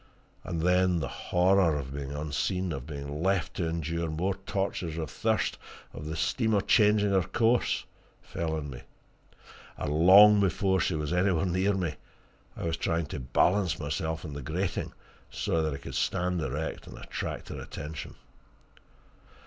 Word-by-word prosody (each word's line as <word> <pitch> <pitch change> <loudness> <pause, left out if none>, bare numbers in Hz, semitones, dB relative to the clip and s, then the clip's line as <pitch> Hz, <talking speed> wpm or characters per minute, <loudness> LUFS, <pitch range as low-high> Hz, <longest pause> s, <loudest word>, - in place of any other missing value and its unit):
And 85 -3 -3
then 90 0 +3
the 70 - -2
horror 90 +2 +2
of 70 -1 -6
being 70 -1 -5
unseen, 80 +5 -2
of 70 -2 -5
being 70 0 -5
left 95 0 0
to 85 -3 0
endure 85 0 -2
more 90 +5 -1
tortures 95 -4 -3
of 80 -4 -4
thirst, - - 0 0.3
of 75 - -7
the 80 - -3
steamer 110 +5 +1
changing 105 -1 +4
her 95 -1 +4
course, 115 +6 +1 0.3
fell 80 -1 -3
on 75 -2 -4
me, 65 0 -8 1.0
and 75 - -2
long 100 +6 +8
before 95 0 +2
she 90 - 0
was 75 +1 -2
anywhere 90 -1 +2
near 95 +3 +1
me 85 -6 -2 0.6
I - - -5
was 80 -1 -1
trying 80 0 0
to - - -3
balance 90 +8 +2
myself 80 +3 -3
on 75 - -6
the 70 - -6
grating, 85 +8 -2 0.4
so 80 - -1
that 80 -1 0
I 70 - -4
could 70 - -9
stand 90 +7 0
erect - - -4
and - - -10
attract - - -5
her - - -6
attention. 75 +1 -7
85 Hz, 160 wpm, -29 LUFS, 75-95 Hz, 1.0 s, long